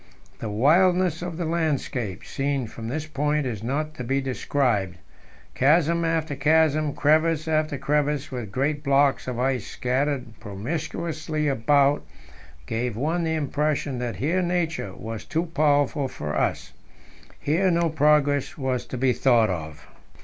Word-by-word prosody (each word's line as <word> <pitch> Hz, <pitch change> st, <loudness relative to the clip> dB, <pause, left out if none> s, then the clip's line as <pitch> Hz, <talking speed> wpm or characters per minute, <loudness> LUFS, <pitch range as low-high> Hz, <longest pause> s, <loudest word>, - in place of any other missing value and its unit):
The 110 Hz, -, -4 dB
wildness 175 Hz, -, +3 dB
of 175 Hz, -2 st, -5 dB
the 175 Hz, -, -2 dB
landscape 145 Hz, -, -2 dB
seen 140 Hz, -2 st, -1 dB
from 115 Hz, +1 st, -8 dB
this 150 Hz, +6 st, -3 dB
point 150 Hz, -1 st, 0 dB
is 115 Hz, -5 st, -3 dB
not 150 Hz, +6 st, -2 dB
to 125 Hz, -, -6 dB
be 135 Hz, +3 st, 0 dB
described; 125 Hz, -7 st, 0 dB, 0.6 s
chasm 165 Hz, +4 st, +3 dB
after 165 Hz, -3 st, 0 dB
chasm, 155 Hz, 0 st, +2 dB
crevasse 155 Hz, +1 st, +2 dB
after 155 Hz, -2 st, 0 dB
crevasse, 145 Hz, 0 st, 0 dB
with 120 Hz, -6 st, -5 dB
great 145 Hz, +5 st, -1 dB
blocks 140 Hz, -1 st, +2 dB
of 125 Hz, -2 st, -3 dB
ice 125 Hz, -3 st, 0 dB
scattered 130 Hz, -2 st, -2 dB
promiscuously 155 Hz, -, -3 dB
about, 140 Hz, +2 st, +3 dB, 0.6 s
gave 115 Hz, -1 st, -2 dB
one 160 Hz, +7 st, 0 dB
the 160 Hz, -1 st, 0 dB
impression 145 Hz, -3 st, -1 dB
that 120 Hz, -2 st, -3 dB
here 170 Hz, +7 st, 0 dB
Nature 170 Hz, -, -1 dB
was 110 Hz, -1 st, -6 dB
too 165 Hz, +1 st, -1 dB
powerful 145 Hz, -3 st, +1 dB
for 75 Hz, -, -5 dB
us. -, -, -1 dB, 0.7 s
Here 170 Hz, +6 st, +1 dB
no 170 Hz, -1 st, +2 dB
progress 150 Hz, -2 st, +2 dB
was 130 Hz, -3 st, -2 dB
to 130 Hz, -, -5 dB
be 130 Hz, 0 st, +2 dB
thought 120 Hz, -6 st, +3 dB
of. 80 Hz, -4 st, -6 dB
145 Hz, 140 wpm, -25 LUFS, 125-155 Hz, 0.7 s, wildness